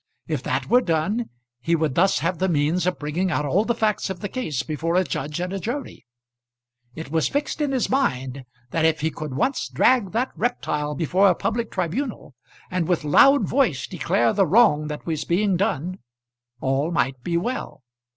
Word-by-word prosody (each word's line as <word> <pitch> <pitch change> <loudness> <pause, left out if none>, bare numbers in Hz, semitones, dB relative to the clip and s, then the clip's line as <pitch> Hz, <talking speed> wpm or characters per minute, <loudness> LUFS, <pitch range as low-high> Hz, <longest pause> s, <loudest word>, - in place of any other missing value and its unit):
If - - -2
that - - -2
were 250 +1 +5
done 190 +6 -1 0.3
he 165 +7 +1
would 155 -4 0
thus 190 +7 +3
have 170 0 -1
the 190 0 +1
means 165 +3 +1
of 180 - 0
bringing 160 +6 -2
out 150 -4 0
all 185 +10 +2
the 235 - 0
facts 215 -4 0
of 190 -2 -5
the 205 - -4
case 155 - -3
before 160 +2 -2
a 185 - +4
jury 140 -2 -3
and 180 +2 -3
a 195 - -2
judge. 245 +9 -5 0.9
It 160 -3 -7
was 160 -1 +2
fixed 290 +2 -2
in 290 -2 0
his 260 -3 0
mind 135 - -1 0.3
that 165 - 0
if 160 -1 +2
he 160 +1 0
could 155 -5 -6
once 260 - 0
drag 235 -7 +3
that 245 +4 0
reptile 150 -11 -2
before 185 +7 +3
a 180 - +3
public 225 +4 -2
tribunal, 190 - -3 0.4
and 180 -3 -1
with 175 -3 +1
loud 275 - +5
voice 235 - +1
declare 185 +4 +1
the 195 -3 +2
wrong 160 -6 +4
that 150 -1 -6
was 160 -3 -2
being 195 +2 +1
done, 180 0 -1 0.6
all 135 +4 0
might 135 -6 0
be 170 +6 -1
well. 170 - -4
175 Hz, 190 wpm, -23 LUFS, 150-215 Hz, 0.9 s, were